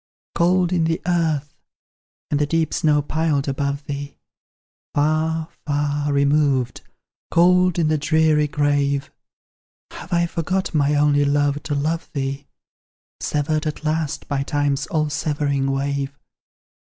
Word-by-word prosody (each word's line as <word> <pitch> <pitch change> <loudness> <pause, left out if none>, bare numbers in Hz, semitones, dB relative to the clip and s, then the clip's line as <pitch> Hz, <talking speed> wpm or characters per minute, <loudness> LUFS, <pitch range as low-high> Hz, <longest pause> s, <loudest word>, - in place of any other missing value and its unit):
Cold 180 +1 +2
in 170 -2 +2
the 165 +2 0
earth 160 -5 0 0.8
and 145 - +1
the 150 - +1
deep 165 +1 0
snow 150 -2 +2
piled 155 -2 0
above 140 +1 -2
thee, 145 0 -6 0.8
Far, 155 +2 +1 0.2
far, 145 0 0
removed, 140 -4 +2 0.5
cold 180 +1 +4
in 165 -2 +2
the 155 -1 +1
dreary 155 0 +3
grave! 145 -2 0 0.8
Have 170 - -10
I 170 0 +3
forgot, 180 +3 -2
my 145 -1 +2
only 145 0 +3
Love, 145 0 +1
to 150 -1 -3
love 160 +4 -1
thee, 140 0 -3 0.7
Severed 155 +1 -1
at 155 - -5
last 155 -1 -2
by 140 -2 -1
Time's 145 -1 -1
all 155 -3 0
severing 145 -3 -1
wave? 140 0 -1
150 Hz, 125 wpm, -21 LUFS, 140-160 Hz, 0.8 s, cold